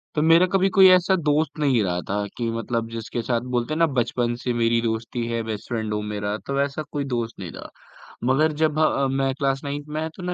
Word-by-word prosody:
तो 150 - +2
मेरा 165 +3 +6
कभी 195 0 +3
कोई 190 -1 +9
ऐसा 185 +1 +5
दोस्त 155 -1 0
नहीं 135 -6 +3
रहा 90 -2 -1
था 105 +1 -1
कि 115 -1 -1
मतलब 115 0 -2
जिसके 115 +1 -4
साथ 115 0 -1
बोलते 120 +5 0
हैं - - -2
ना, 165 - +6
बचपन 120 -2 0
से 125 - 0
मेरी 115 0 +2
दोस्ती 115 +1 -2
है 115 0 -1
बेस्ट 110 -2 -5
फ्रेंड 110 -3 -2
हो 105 - -1
मेरा 105 0 -3
तो 140 0 -1
ऐसा 140 +2 -2
कोई 145 -1 -2
दोस्त 115 -1 -4
नहीं 90 -4 -6
था। - - -9 0.5
मगर 145 +5 +3
जब 155 -1 +2
ह 140 -3 +2
मैं 135 0 0
क्लास 135 -1 0
9th 145 +1 -4
में 150 +1 -3
आया 160 +1 -2
तो 185 - -9
ना 180 - -2
130 Hz, 240 wpm, -23 LUFS, 115-150 Hz, 0.5 s, कोई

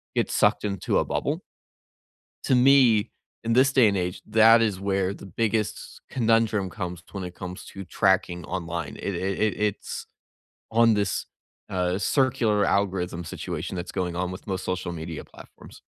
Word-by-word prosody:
get - - +1
sucked - - +3
into 100 -3 -1
a - - 0
bubble. - - -2 1.0
To - - +2
me, 125 -4 +5 0.3
in 115 0 0
this 130 +2 +4
day 130 -5 +6
and 100 -1 +1
age, 90 -1 -3
that 115 +1 +6
is 105 -5 0
where 95 -1 0
the - - -11
biggest 110 +3 -2
conundrum 115 -5 +2
comes 90 -3 -5
when 95 -2 -5
it 90 -1 -6
comes 90 +1 -8
to 95 - -7
tracking 90 -1 +1
online. 85 -3 -4
It 100 - -3
it 95 +2 -2
it 110 -3 +2
it's 105 -1 -2 0.6
on 115 0 +4
this, 100 -3 -1 0.4
uh, 90 -1 0
circular 110 -3 +2
algorithm 90 -4 0
situation 85 +3 -5
that's 90 0 -5
going 90 -2 -2
on 90 +1 -2
with 95 - -9
most 95 -2 -3
social 90 -1 -2
media 80 -1 -6
platforms. - - -15
100 Hz, 160 wpm, -25 LUFS, 90-110 Hz, 1.0 s, day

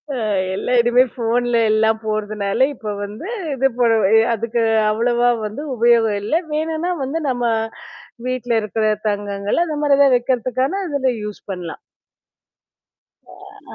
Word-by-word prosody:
அ - - -3 0.4
எல்லா 250 - -2
இனிமே 240 +2 +4
ஃபோன்ல 240 0 0
எல்லாம் 220 0 +2
போட்றதுனால 215 +2 0
இப்ப 210 -2 -5
வந்து 215 - -8 0.3
இது 270 +1 +2
பண்ணுவ 225 -4 +3 0.2
அதுக்கு 230 +1 -2 0.3
அவ்வளவா 240 +2 +2 0.2
வந்து 215 +7 -5
உபயோகம் 230 -3 +3
இல்ல. 215 - -4 0.2
வேணுன்னா 320 +3 -1
வந்து 290 +5 -2
நம்ம 245 -1 -1 0.8
வீட்ல 255 -2 -3
இருக்கிற 215 +1 -2 0.2
தங்கங்கள் 205 +7 -1
அந்தமாரி 295 -3 +1
எதா 280 -1 +6
வைக்கிறதுக்கான 255 - -1
இதுல 280 -4 0
யூஸ் 210 -1 -7
பண்லாம். 175 -3 -6 1.9
அ - - -10
235 Hz, 120 wpm, -19 LUFS, 215-260 Hz, 1.9 s, எதா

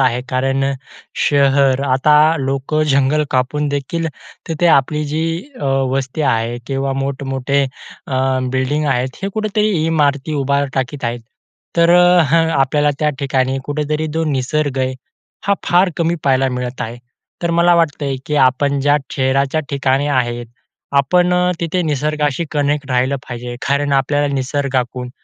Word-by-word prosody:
आहे. 125 -2 +2
कारण 135 +1 0 0.6
शहर 140 -2 +3
आता 135 +3 +3 0.2
लोकं 135 +3 -1
जंगल 140 +2 +2
कापून 135 +3 0
देखील 145 +4 -2 0.4
तिथे 165 +2 0
आपली 150 0 +3
जी 155 +2 -2 0.4
अ, - - -3 0.3
वस्ती 135 +3 -2
आहे 115 +1 -1
किंवा 135 0 -1
मोठ-मोठे 135 0 -1 0.4
अ, 135 - -4 0.4
बिल्डिंग 135 +4 0
आहेत 130 -1 -1
हे 195 - -1
कुठेतरी 215 0 0 0.2
इमारती 150 -2 +1
उभार 140 0 +1
टाकीत 130 0 -3
आहेत. 120 0 -2 0.6
तर 170 0 +4 0.7
आपल्याला 145 +2 +2
त्या 150 - +2
ठिकाणी 135 -1 0
कुठेतरी 150 +1 -2
जो 165 0 0
निसर्ग 140 0 -1
आहे 130 0 0 0.5
हा 200 - +4
फार 180 +1 +3
कमी 170 0 +1
पाहायला 135 -1 +3
मिळत 125 0 -4
आहे. 115 +2 -6 0.4
तर 170 - 0
मला 175 +1 +5
वाटतंय, 145 -5 0
की 150 - -2
आपण 140 +1 +2
ज्या 145 +1 +3
शहराच्या 135 +3 +1
ठिकाणी 140 0 +1
आहे, 120 -3 0 0.5
आपण 175 +6 +3
अ, 180 0 +2
तिथे 170 +2 -1
निसर्गाशी 150 0 -1
कनेक्ट 145 -1 -1
राहिलं 130 +2 +1
पाहिजे. 120 0 -6
कारण 140 0 +1
आपल्याला 145 +2 +1
निसर्गाकडून 130 -2 -2
140 Hz, 140 wpm, -17 LUFS, 130-150 Hz, 0.7 s, मला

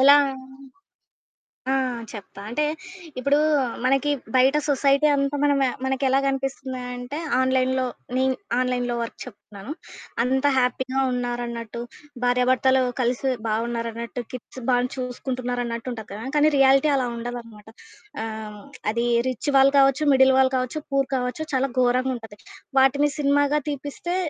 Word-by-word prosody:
ఎలా? 280 +2 +8 1.6
ఆ! - - +3 0.4
చెప్తా. 200 -2 -10
అంటే, 300 +6 0 0.6
ఇప్పుడూ 280 +3 +2 0.5
మనకి 275 +3 +2 0.3
బయట 265 +3 +5
సొసైటీ 280 +1 +3
అంతా 275 +1 0
మన 290 0 +4
మ - - +4 0.2
మనకెలా 265 0 +1
గనిపిస్తుంది 270 -1 -3
అంటే, 245 +4 -6 0.2
ఆన్‌లైన్‌లో 260 0 +2 0.3
నేను 260 0 +2 0.2
ఆన్‌లైన్‌లో 250 -1 0
వరకు 230 - -5
చెప్తున్నాను. 210 0 -10 0.5
అంతా 265 +3 +2
హ్యాపీగా 260 +1 0
ఉన్నారన్నట్టు, 240 -2 -4 0.4
భార్యాభర్తలు 255 +1 +3 0.2
కలిసి 255 +2 0 0.2
బావున్నారన్నట్టు 230 +2 -3
కిడ్స్ 255 +1 -9
బానే 245 0 +2
చూసుకుంటున్నారన్నట్టుంటది 245 -2 -4
కదా! 215 +3 -7
కానీ 300 +1 +5
రియాలిటీ 275 +2 +5
అలా 255 -2 0
ఉండదనమాట. 230 -3 -7 0.6
ఆహ్, 220 -1 -5
హ్మ్. - - -12 0.3
అది 235 +1 0 0.2
రిచ్ 255 +4 -2
వాళ్ళు 275 +1 +5
కావచ్చు, 275 +2 +4
మిడిల్ 265 0 +6
వాళ్ళు 265 0 +4
కావచ్చు, 255 +4 -2
పూర్ 275 -1 +2
కావచ్చు, 250 +5 -2
చాలా 265 +1 +2
ఘోరంగుంటది. 245 -4 -1 0.4
వాటిని 280 +2 +4
సినిమాగా 285 +1 +2
తీపిస్తే 290 +6 -4
255 Hz, 120 wpm, -24 LUFS, 240-270 Hz, 1.6 s, ఎలా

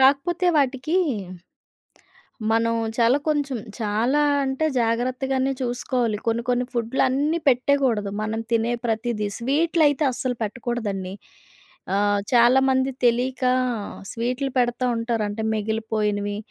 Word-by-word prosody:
కాకపోతే 290 +7 +3
వాటికి, 275 +4 0 1.6
మనం 230 +1 +2 0.2
చాలా 235 +3 +4
కొంచెం 285 -4 0 0.2
చాలా 230 +7 +1 0.2
అంటే, 265 +4 -1 0.2
జాగ్రత్తగానే 255 +3 0
చూసుకోవాలి. 245 -2 -1
కొన్ని, 230 +1 +1
కొన్ని 250 0 +1
ఫుడ్‌లన్నీ 265 +6 +1
పెట్టేకూడదు. 250 -5 +1
మనం 220 +1 -2
తినే 230 +1 +2
ప్రతీదీ 220 -1 -1
స్వీట్‌లైతే 295 +3 +2
అస్సల 250 0 -2
పెట్టకూడదండి. 210 -4 -3 0.8
ఆహ్, 205 0 +2
చాలామంది 260 +2 +4
తెలియక 250 +2 +1 0.7
స్వీట్‌లుపెడతా 250 0 -1
ఉంటారు. 230 -1 -1
అంటే 205 +2 -4
మిగిలిపోయినవి, 210 -1 -1
245 Hz, 95 wpm, -23 LUFS, 225-265 Hz, 1.6 s, చాలా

